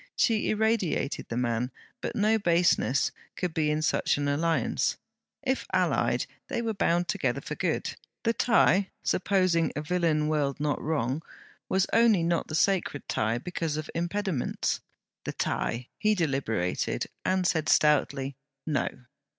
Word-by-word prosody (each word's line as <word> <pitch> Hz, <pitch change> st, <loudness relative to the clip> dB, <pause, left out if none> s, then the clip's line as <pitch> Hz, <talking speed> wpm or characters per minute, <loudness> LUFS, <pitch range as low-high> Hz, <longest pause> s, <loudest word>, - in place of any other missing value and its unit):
She 225 Hz, -3 st, +2 dB
irradiated 215 Hz, -9 st, 0 dB
the 115 Hz, -, -3 dB
man; 120 Hz, 0 st, 0 dB, 0.3 s
but -, -, -4 dB
no 215 Hz, +1 st, +3 dB
baseness 170 Hz, -7 st, +2 dB, 0.2 s
could 180 Hz, -3 st, -2 dB
be 155 Hz, -2 st, +1 dB
in 155 Hz, +1 st, 0 dB
such -, -, +2 dB
an 145 Hz, 0 st, -1 dB
alliance. 145 Hz, -2 st, +1 dB, 0.5 s
If 265 Hz, -1 st, -1 dB
allied, -, -, +2 dB, 0.2 s
they -, -, -2 dB
were 225 Hz, -1 st, -1 dB
bound 175 Hz, -3 st, +1 dB
together -, -, 0 dB
for -, -, -6 dB
good. -, -, -1 dB, 0.3 s
The 230 Hz, -1 st, +2 dB
tie 205 Hz, -5 st, +3 dB
supposing 185 Hz, -3 st, +2 dB
a 150 Hz, -, -2 dB
villain 160 Hz, -2 st, +1 dB
world 145 Hz, -3 st, 0 dB
not 150 Hz, 0 st, -1 dB
wrong 145 Hz, -2 st, -1 dB, 0.5 s
was 190 Hz, 0 st, +3 dB
only 225 Hz, -6 st, +5 dB
not 170 Hz, 0 st, 0 dB
the 155 Hz, -, -4 dB
sacred 180 Hz, -4 st, +1 dB
tie 110 Hz, +1 st, 0 dB
because 165 Hz, +1 st, -3 dB
of 155 Hz, -, -5 dB
impediments. 175 Hz, -3 st, -1 dB, 0.4 s
The -, -, -4 dB
tie! 120 Hz, +2 st, -2 dB
he 215 Hz, 0 st, +3 dB
deliberated, 135 Hz, -, -1 dB, 0.2 s
and 185 Hz, 0 st, +1 dB
said 160 Hz, -3 st, +1 dB
stoutly 140 Hz, -2 st, +3 dB, 0.3 s
No. 150 Hz, -5 st, 0 dB
165 Hz, 140 wpm, -28 LUFS, 145-190 Hz, 0.5 s, only